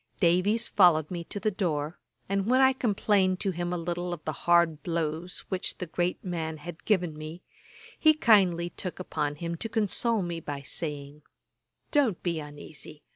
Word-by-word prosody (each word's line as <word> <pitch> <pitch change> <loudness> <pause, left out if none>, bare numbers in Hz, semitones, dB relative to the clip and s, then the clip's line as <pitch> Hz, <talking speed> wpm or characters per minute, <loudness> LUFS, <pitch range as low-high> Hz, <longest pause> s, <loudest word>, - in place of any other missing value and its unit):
Davies 195 +6 +3
followed 170 -5 +4
me 175 -2 -3
to 205 - -5
the 215 +2 0
door, 165 -5 -2 0.3
and 195 +1 0
when 255 +2 +4
I 265 0 +6
complained 200 -6 +2
to 195 - +1
him 175 0 -3
a 180 - -1
little 175 +1 -3
of 160 -3 -8
the 155 - 0
hard 170 -1 +3
blows 165 +1 -2
which 190 -1 -2
the 180 - -4
great 175 +2 -2
man 160 -3 -3
had 165 +3 -9
given 180 -7 +1
me, 155 +3 -8 0.6
he 310 -1 +6
kindly 185 - +4
took 180 -1 -5
upon 150 -5 -2
him 170 +2 -4
to 225 - -4
console 220 0 +1
me 170 -1 -3
by 145 -3 -6
saying, 145 -1 -4 0.7
'Don't 265 - +2
be 170 -3 -1
uneasy. 150 0 -10
175 Hz, 175 wpm, -28 LUFS, 160-195 Hz, 0.7 s, I